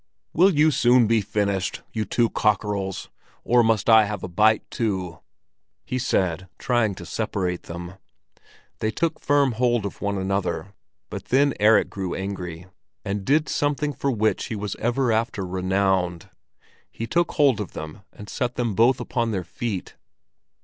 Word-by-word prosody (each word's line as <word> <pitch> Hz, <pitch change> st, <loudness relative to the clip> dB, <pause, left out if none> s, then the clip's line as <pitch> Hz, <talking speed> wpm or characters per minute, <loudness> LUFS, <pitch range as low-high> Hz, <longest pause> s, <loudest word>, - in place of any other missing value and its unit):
"Will 185 Hz, +5 st, +5 dB
you 155 Hz, -3 st, +4 dB
soon 125 Hz, -2 st, +4 dB
be 110 Hz, 0 st, +2 dB
finished, 100 Hz, -2 st, -1 dB
you 110 Hz, -1 st, -1 dB
two 115 Hz, +1 st, +1 dB
cockerels, 100 Hz, -2 st, -1 dB, 0.3 s
or 120 Hz, +1 st, +4 dB
must 110 Hz, -4 st, +1 dB
I 110 Hz, -2 st, +7 dB
have 105 Hz, -1 st, -5 dB
a -, -, -3 dB
bite 105 Hz, +4 st, +3 dB
too?" 95 Hz, -7 st, -2 dB, 0.7 s
he 130 Hz, -, -2 dB
said, 95 Hz, -7 st, 0 dB
trying 120 Hz, -5 st, +1 dB
to 90 Hz, -, -9 dB
separate 90 Hz, -3 st, -3 dB
them. 85 Hz, +2 st, -7 dB, 0.8 s
They 110 Hz, -, 0 dB
took 165 Hz, +7 st, -1 dB
firm 145 Hz, -2 st, +2 dB
hold 120 Hz, -2 st, +1 dB
of 100 Hz, -, -6 dB
one 100 Hz, 0 st, -1 dB
another, 95 Hz, 0 st, -2 dB, 0.4 s
but -, -, -6 dB
then 140 Hz, +2 st, +3 dB
Erik 105 Hz, +1 st, +4 dB
grew 95 Hz, -2 st, -4 dB
angry, 90 Hz, -3 st, -5 dB, 0.4 s
and 100 Hz, 0 st, -2 dB
did 150 Hz, +7 st, +2 dB
something 145 Hz, 0 st, 0 dB
for 140 Hz, -, -2 dB
which 110 Hz, -4 st, 0 dB
he 110 Hz, -, -4 dB
was 105 Hz, -1 st, -4 dB
ever 120 Hz, +2 st, 0 dB
after 110 Hz, -3 st, -1 dB
renowned. 95 Hz, -1 st, 0 dB, 0.6 s
He 115 Hz, -, -5 dB
took 170 Hz, +8 st, 0 dB
hold 140 Hz, -7 st, +3 dB
of 100 Hz, -, -7 dB
them 80 Hz, +6 st, -8 dB
and 105 Hz, -, -11 dB
set 125 Hz, +1 st, -3 dB
them 120 Hz, -3 st, -1 dB
both 115 Hz, +6 st, +4 dB
upon 120 Hz, -2 st, -1 dB
their 95 Hz, -4 st, -2 dB
feet. 105 Hz, -1 st, -5 dB
105 Hz, 160 wpm, -24 LUFS, 95-120 Hz, 0.8 s, I